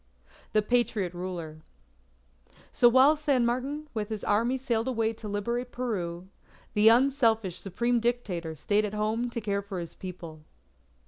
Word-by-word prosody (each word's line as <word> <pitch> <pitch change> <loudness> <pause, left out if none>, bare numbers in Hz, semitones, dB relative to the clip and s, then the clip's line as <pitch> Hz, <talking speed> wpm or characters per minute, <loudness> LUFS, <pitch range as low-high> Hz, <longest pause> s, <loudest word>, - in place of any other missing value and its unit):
THE 215 -1 +3
PATRIOT 215 -5 +1
RULER 175 -3 -6 1.1
So 240 - +5
while 265 +5 +6
San 285 -5 +1
Martin 270 +6 -2
with 215 -3 -3
his 215 -2 -4
army 235 +5 +1
sailed 240 -3 -1
away 225 -3 0
to 220 -1 -9
liberate 235 +5 -2
Peru, 185 -8 -3 0.5
the 210 +1 +6
unselfish 230 - +3
Supreme 235 +5 0
Dictator 205 -9 -2
stayed 205 +8 +1
at 210 0 -3
home 220 +3 -1
to 235 - -4
care 200 -2 -1
for 200 -2 -6
his 170 -1 -7
people. 170 -4 -9
220 Hz, 145 wpm, -28 LUFS, 195-245 Hz, 1.1 s, while